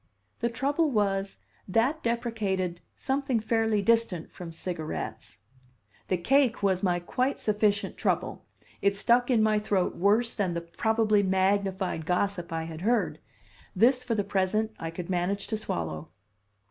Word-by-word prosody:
The 235 - 0
trouble 285 +7 +1
was 200 -4 0 0.3
that 240 +11 +1
deprecated 210 -7 -1
something 270 -2 0
fairly 220 -1 +1
distant 225 -7 +1
from 175 -2 -8
cigarettes. 160 - -5 0.7
The 185 - +1
cake 255 +4 +2
was 190 -2 +2
my 180 -2 +1
quite 255 +10 -1
sufficient 210 -1 0
trouble; - - -1 0.4
it 200 0 +2
stuck 240 +5 +3
in 230 -4 +4
my 215 -1 +3
throat 200 -3 0
worse 215 +5 +3
than 185 -5 -1
the 170 - -2
probably 215 +4 +1
magnified 190 -3 0
gossip 180 -1 -1
I 165 0 -2
had 160 0 -7
heard; 205 -7 +1 0.6
this, 250 +6 +4
for 240 -2 -1
the 205 - +1
present, 200 +3 0
I 165 - -4
could 170 +1 -6
manage 185 +3 -1
to 220 - 0
swallow. 80 - -4
205 Hz, 145 wpm, -28 LUFS, 180-230 Hz, 0.7 s, in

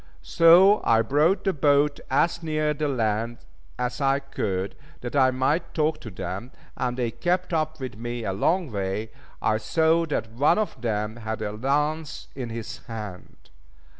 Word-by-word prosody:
So 180 +5 +6
I 115 0 +4
brought 150 - +2
the 195 - +1
boat 145 0 +3
as 165 +5 +2
near 155 -2 0
the 150 +1 -2
land 115 -3 -1 0.4
as 125 +3 -3
I 135 0 +3
could, 100 -8 -3 0.3
that 120 +3 -5
I 130 -2 +5
might 145 +6 0
talk 155 0 +1
to 110 - -7
them, 95 +5 -6 0.3
and 125 0 -2
they 120 -2 -1
kept 180 +3 -1
up 155 -1 -1
with 130 -5 -6
me 120 +1 -4
a 95 - -2
long 165 - +1
way. 100 +2 -3 0.3
I 110 -1 +2
saw 160 +8 +2
that 115 -7 -2
one 145 +9 +3
of 215 - -2
them 110 -1 -2
had 110 -1 -4
a 105 - -2
lance 145 +7 -1
in 125 -3 -5
his 115 +1 -6
hand. 105 - -9
130 Hz, 165 wpm, -25 LUFS, 110-155 Hz, 0.4 s, So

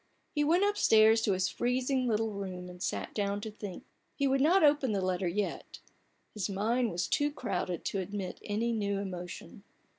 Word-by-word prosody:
He 295 - +1
went 340 +6 +3
upstairs 225 - +5
to 205 - +2
his 185 0 +1
freezing 255 +1 0
little 225 -1 +1
room, 185 -3 -6
and 180 0 -13
sat - - -3
down 200 -1 -1
to 220 - -5
think. 205 -3 -8 0.3
He 280 - 0
would 270 0 +2
not 345 +6 +5
open 285 -5 +4
the 200 - +1
letter 185 0 0
yet: 195 +4 -3 0.6
his 210 -1 -3
mind 225 +5 +1
was 175 0 -1
too 290 0 +1
crowded 180 - -3
to 195 - -1
admit 190 0 -5
any 220 +3 -1
new 200 -3 -1
emotion. 185 0 -7
210 Hz, 180 wpm, -31 LUFS, 190-250 Hz, 0.6 s, upstairs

